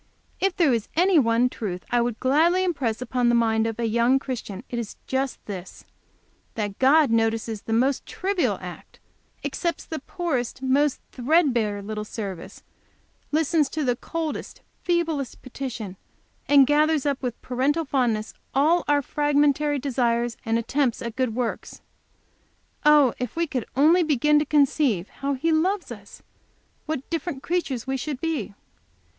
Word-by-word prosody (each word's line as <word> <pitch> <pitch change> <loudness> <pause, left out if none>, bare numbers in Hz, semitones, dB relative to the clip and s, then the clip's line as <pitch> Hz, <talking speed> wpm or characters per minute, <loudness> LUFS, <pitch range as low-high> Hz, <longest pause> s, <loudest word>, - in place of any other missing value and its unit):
If 390 -1 +1
there 325 -9 +3
is 230 -3 -1
any 360 0 +5
one 230 -1 +3
truth 190 -7 -5
I 240 0 +3
would 235 -2 -2
gladly 325 +8 +3
impress 260 -10 -1
on 245 -2 +2
the 240 - +3
mind 225 -1 +2
of 225 0 -4
a 235 - 0
you 235 +4 +3
Christian, 240 -6 -5
it 240 - -4
is 225 -3 -6
just 265 0 -1
this, 190 -3 -8 0.7
that 205 -3 -3
God 275 0 +5
notices 225 -1 0
the 225 - -4
most 260 +4 +2
trivial 380 -1 0
act, - - -10 0.5
accepts 340 -1 -2
the 320 - -5
poorest, 265 -5 -3
most 275 +2 +2
threadbare 245 -7 +1
little 210 +1 -4
service, 200 -4 -7 0.7
listens 310 -1 +2
to 310 +2 -2
the 250 -3 +1
coldest, 320 +4 -5 0.2
feeblest 330 -7 -1
petition, 240 -7 -6 0.5
and 280 -2 +7
gathers 300 +1 +2
up 280 -2 0
with 250 -3 -4
parental 280 +6 0
fondness 240 -6 0 0.2
all 320 +5 +3
our 290 -1 +3
fragmentary 290 0 +2
desires 240 -3 0
and 225 0 +1
attempts 245 +2 0
at 235 -1 -5
good 255 -4 -1
works. 245 -2 -3 1.0
Oh, 295 -5 +6
if 250 -3 -4
we 335 +1 +1
could 265 -6 -4
only 315 +7 +5
begin 300 -1 +3
to 300 - 0
conceive 275 - +2
how 275 0 -3
He 325 +6 0
loves 365 +5 +1
us, - - -11 0.6
what 305 -4 -3
different 325 -4 -3
creatures 310 -9 -2
we 265 0 -1
should 275 0 -4
be!" 285 - -3
265 Hz, 150 wpm, -24 LUFS, 235-300 Hz, 1.0 s, and